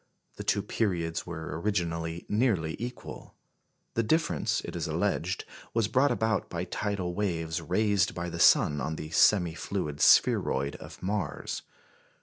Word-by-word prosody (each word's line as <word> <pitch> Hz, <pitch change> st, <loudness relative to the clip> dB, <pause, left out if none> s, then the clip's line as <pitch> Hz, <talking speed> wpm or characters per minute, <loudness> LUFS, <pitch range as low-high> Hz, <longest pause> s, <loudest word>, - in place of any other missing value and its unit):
The -, -, -5 dB
two 100 Hz, -, +1 dB
periods 85 Hz, -7 st, -1 dB
were 80 Hz, -2 st, -5 dB
originally 85 Hz, -4 st, -2 dB
nearly 105 Hz, -8 st, +1 dB
equal. 120 Hz, +2 st, -7 dB, 0.6 s
The 115 Hz, -, +1 dB
difference, 115 Hz, -, +1 dB
it -, -, -7 dB
is -, -, -2 dB
alleged, -, -, -1 dB, 0.3 s
was 115 Hz, -2 st, +2 dB
brought 130 Hz, +5 st, +3 dB
about 110 Hz, -1 st, 0 dB
by 85 Hz, 0 st, -3 dB
tidal 95 Hz, -1 st, -2 dB
waves 85 Hz, -4 st, -2 dB
raised 100 Hz, +3 st, +1 dB
by 85 Hz, 0 st, -3 dB
the 85 Hz, -, -5 dB
sun 75 Hz, -3 st, +5 dB
on 80 Hz, -, -2 dB
the 80 Hz, 0 st, -7 dB
semi 90 Hz, -2 st, +4 dB
fluid 80 Hz, -5 st, -4 dB
spheroid 70 Hz, +2 st, +4 dB
of -, -, -12 dB
Mars. 95 Hz, -7 st, -2 dB
90 Hz, 140 wpm, -29 LUFS, 80-105 Hz, 0.6 s, sun